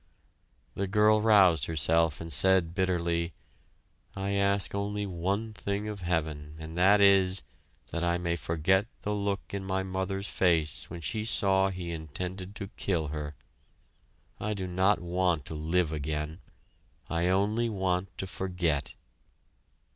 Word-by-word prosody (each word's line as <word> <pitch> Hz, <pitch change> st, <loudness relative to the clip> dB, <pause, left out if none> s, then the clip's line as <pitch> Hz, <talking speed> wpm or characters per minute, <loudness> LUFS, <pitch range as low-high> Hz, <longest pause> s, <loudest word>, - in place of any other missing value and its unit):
The 100 Hz, -, -2 dB
girl 105 Hz, +2 st, +4 dB
roused 100 Hz, -7 st, +5 dB
herself 80 Hz, 0 st, +1 dB
and 80 Hz, 0 st, -4 dB
said, 95 Hz, -3 st, +4 dB
bitterly: 85 Hz, -3 st, 0 dB, 0.8 s
"I 100 Hz, 0 st, -2 dB
ask 100 Hz, 0 st, +1 dB
only 100 Hz, +1 st, -2 dB
one 100 Hz, +4 st, -2 dB
thing 100 Hz, 0 st, -3 dB
of 105 Hz, -1 st, -5 dB
heaven 80 Hz, -4 st, -2 dB
and 80 Hz, +1 st, -8 dB
that 95 Hz, +4 st, +5 dB
is, 95 Hz, -1 st, +5 dB, 0.5 s
that 85 Hz, -, -2 dB
I 85 Hz, 0 st, +2 dB
may 85 Hz, -1 st, -1 dB
forget 85 Hz, +5 st, +1 dB, 0.2 s
the 105 Hz, -, -1 dB
look 100 Hz, -1 st, -3 dB
in 100 Hz, -1 st, -3 dB
my 95 Hz, 0 st, -1 dB
mother's 95 Hz, +1 st, -3 dB
face 80 Hz, -6 st, +2 dB
when 85 Hz, 0 st, -7 dB
she 110 Hz, +6 st, -2 dB
saw 95 Hz, -3 st, +3 dB
he 90 Hz, -2 st, -5 dB
intended 90 Hz, +5 st, -5 dB
to 100 Hz, -3 st, -6 dB
kill 80 Hz, -6 st, -1 dB
her. 75 Hz, -1 st, -5 dB, 1.0 s
I 105 Hz, 0 st, -2 dB
do 95 Hz, -2 st, -4 dB
not 95 Hz, +2 st, +2 dB
want 90 Hz, -3 st, 0 dB
to -, -, -7 dB
live 80 Hz, +2 st, 0 dB
again. 75 Hz, +2 st, -3 dB, 0.7 s
I 85 Hz, +1 st, 0 dB
only 105 Hz, +5 st, +1 dB
want 95 Hz, -2 st, -2 dB
to -, -, -3 dB
forget!" 90 Hz, -6 st, -2 dB
95 Hz, 140 wpm, -29 LUFS, 85-100 Hz, 1.0 s, roused